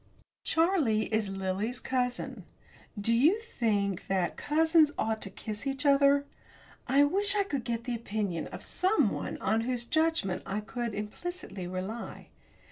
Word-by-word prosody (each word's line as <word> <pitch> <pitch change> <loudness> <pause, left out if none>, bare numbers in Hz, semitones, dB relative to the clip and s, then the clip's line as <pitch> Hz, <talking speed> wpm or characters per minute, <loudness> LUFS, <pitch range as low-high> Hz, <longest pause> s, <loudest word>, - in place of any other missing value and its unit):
Charlie 320 - +2
is 215 -2 +1
Lily's 195 +5 -2
cousin. 250 -1 -2 0.6
Do 225 +3 +1
you 305 - +4
think 210 - -1
that 185 -3 0
cousins 320 0 +4
ought 220 0 -1
to - - -5
kiss 215 +5 -6
each 275 +2 -1
other? 280 0 +5 0.6
I 275 +3 +5
wish 395 +7 +2
I 405 - +3
could 280 -10 -3
get 235 -1 -2
the 245 0 -3
opinion 210 -7 -2
of - - -7
someone 380 +4 0
on 225 - +1
whose 240 0 -2
judgment 315 - +1
I 200 - -3
could 235 +1 -4
implicitly 210 - -5
rely. 190 +6 -5
240 Hz, 140 wpm, -30 LUFS, 210-295 Hz, 0.6 s, other